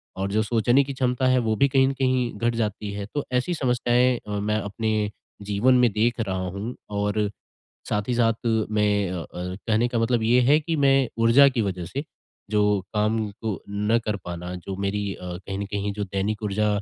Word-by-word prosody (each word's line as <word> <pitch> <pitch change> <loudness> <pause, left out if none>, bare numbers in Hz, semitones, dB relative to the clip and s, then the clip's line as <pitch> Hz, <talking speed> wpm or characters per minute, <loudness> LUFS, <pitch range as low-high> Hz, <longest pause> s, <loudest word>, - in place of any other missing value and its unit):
और 95 +1 -2
जो 110 +2 +2
सोचने 120 +4 +3
की 140 0 -5
क्षमता 130 -1 0
है 130 0 +4
वो 110 - +2
भी 140 +6 +4
कहीं 130 0 +4
न 135 - 0
कहीं 130 -2 +1
घट 120 +1 +1
जाती 105 -2 -2
है। 100 0 -5
तो 145 - -2
ऐसी 125 +8 0
समस्याएँ 125 -3 +2
अ, 105 -1 -2
मैं 105 +1 0
अपने 105 0 -1 0.4
जीवन 115 +6 +4
में 120 - +4
देख 115 +4 +1
रहा 100 -4 -1
हूँ, 100 +7 -5
और, 105 0 0 0.6
साथ 105 -1 -1
ही 125 - +1
साथ 115 -1 +1 0.2
मैं 105 -3 +1
अ 90 -1 -3
अर 90 +2 -6
कहने 115 +1 +2
का 120 -1 -1
मतलब 115 0 +1
ये 120 +3 +4
है 150 - +6
कि 165 +2 -3
मैं 135 -3 +3
ऊर्जा 115 +5 +6
की 130 -3 -1
वजह 95 -3 -3
से, 135 - -4 0.5
जो 105 -1 +2
काम 105 +1 +1
को 105 0 -5
ना 105 +3 +1
कर 110 -2 -2
पाना 90 +1 -5
जो 95 +2 -6
मेरी 100 +1 -2
अ, - - -14 0.2
कहीं 95 +2 -6
न 100 - -2
कहीं 100 0 -3
जो 105 0 -3
दैनिक 100 +2 -2
ऊर्जा 105 +1 0
110 Hz, 205 wpm, -24 LUFS, 100-125 Hz, 0.6 s, है